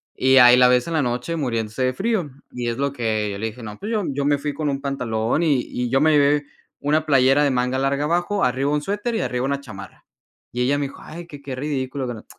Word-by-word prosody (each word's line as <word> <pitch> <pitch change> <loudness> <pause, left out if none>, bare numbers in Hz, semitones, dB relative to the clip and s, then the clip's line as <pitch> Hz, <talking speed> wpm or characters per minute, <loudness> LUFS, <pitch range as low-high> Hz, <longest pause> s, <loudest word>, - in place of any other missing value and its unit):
Y 130 +1 +4
ahí 125 -1 +9
la 125 0 +6
ves 125 0 +3
en 170 - -3
la 160 - +2
noche 125 +6 -2
muriéndose 115 -4 -2
de 130 0 +1
frío, 200 - -1 0.2
y 120 -1 -4
es 115 - -3
lo 140 +1 0
que 110 -5 -1
yo 100 - -5
le 110 - -2
dije: 115 +2 -9
"No, 105 -1 -8
pues 210 - -5
yo 215 -3 0
yo 140 0 -2
me 145 0 +3
fui 145 +1 -4
con 150 +1 -2
un 135 0 -3
pantalón 125 -2 -1
y 145 -6 +2
y 125 0 -3
yo 135 +2 +2
me 155 +1 +4
lleve 145 0 +3 0.3
una 155 +2 +1
playera 135 0 +4
de 140 - +2
manga 125 0 0
larga 140 +1 0
abajo, 175 +5 0
arriba 130 +3 +1
un 150 0 0
suéter 210 +8 -3
y 220 - 0
arriba 125 +1 -2
una 140 0 -1
chamarra". 110 -8 -11 0.5
Y 125 - -3
ella 140 +3 +2
me 145 - -1
dijo: - - -13
"Ay, 170 +2 -9
qué 145 -4 -11
qué 135 -2 -6
ridículo, 135 -1 -3
qué 120 - -3
no" 110 - -12
135 Hz, 260 wpm, -22 LUFS, 125-150 Hz, 0.5 s, ahí